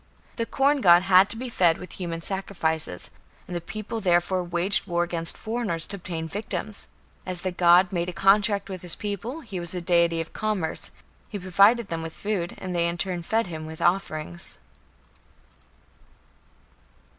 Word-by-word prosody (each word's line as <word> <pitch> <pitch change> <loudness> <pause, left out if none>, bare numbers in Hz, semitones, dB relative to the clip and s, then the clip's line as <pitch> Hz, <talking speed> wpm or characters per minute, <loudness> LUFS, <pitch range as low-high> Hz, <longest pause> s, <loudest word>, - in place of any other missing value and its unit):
The 230 -1 -1
corn 280 +1 +2
god 175 -2 +7
had 190 +1 +6
to 225 - -1
be 255 +2 -4
fed 175 -8 +3
with 185 - -10
human 170 -2 -3
sacrifices, 165 - -2 0.3
and 180 - -6
the 175 - -2
people 215 +4 -5
therefore 180 0 +2
waged 175 +3 0
war 175 0 +1
against 170 -1 -2
foreigners 220 -7 -2
to 200 - -6
obtain 165 -3 -5
victims. 210 +2 -4 0.4
As 180 -1 -3
the 185 - -2
god 175 +1 +5
made 175 0 -1
a - - -3
contract 200 +2 +3
with 190 -3 -6
his 175 -2 -3
people, 215 - -4
he 195 - -6
was 175 +1 -2
a - - -1
deity 170 -1 +2
of 165 - -5
commerce; 210 -7 -1 0.4
he 210 - -4
provided 200 +5 +4
them 165 -1 -3
with 165 0 -6
food 200 -5 -2
and 185 -1 -5
they 170 0 +2
in 170 0 -2
turn 180 -1 -2
fed 220 +7 0
him 160 -3 -6
with 160 0 -8
offerings. 175 -2 -1
180 Hz, 170 wpm, -26 LUFS, 170-200 Hz, 0.4 s, god